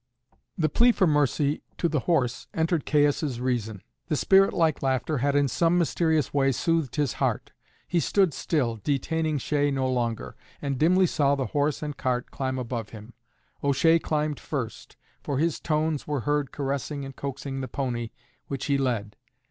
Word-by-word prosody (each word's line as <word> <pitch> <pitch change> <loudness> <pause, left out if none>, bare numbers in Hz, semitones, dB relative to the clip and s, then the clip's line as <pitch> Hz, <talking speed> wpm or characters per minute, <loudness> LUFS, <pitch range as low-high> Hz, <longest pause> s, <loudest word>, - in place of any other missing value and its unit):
The 155 - +2
plea 235 +11 +4
for 200 -5 +2
mercy 145 -1 +1 0.2
to 170 - +1
the 155 -2 0
horse 130 -5 0
entered 160 -1 0
Caius' 145 -3 +2
reason. 120 -5 -2 0.2
The 160 - 0
spirit 195 +6 +5
like 160 -4 +1
laughter 135 +2 0
had 140 +2 +1
in 145 -1 +3
some 170 +6 +2
mysterious 160 -3 +1
way 135 -1 +3
soothed 165 -3 0
his 145 -5 0
heart. - - 0 0.4
He 175 - +1
stood 190 -1 +2
still, 125 -9 -1
detaining 155 +3 0
O'Shea 145 +1 +1
no 135 -2 0
longer, 120 -3 -2 0.2
and 140 -3 -3
dimly 185 +4 +4
saw 140 -4 +2
the 135 -2 -2
horse 145 +1 0
and 150 -1 -4
cart 125 -1 -1
climb 130 -1 -2
up 125 - -3
above 115 -2 -4
him. 110 +2 -11 0.5
O'Shea 145 +4 +4
climbed 150 -2 -1
first, 125 -8 -5 0.2
for 140 - -2
his 165 +3 0
tones 155 -1 -1
were 145 -4 -1
heard 145 0 0
caressing 140 0 -3
and 135 0 -9
coaxing 135 0 -5
the 130 - -4
pony, 120 -3 -3 0.4
which 140 - -4
he 140 -1 +1
led. 115 -6 -1
145 Hz, 170 wpm, -26 LUFS, 130-155 Hz, 0.5 s, spirit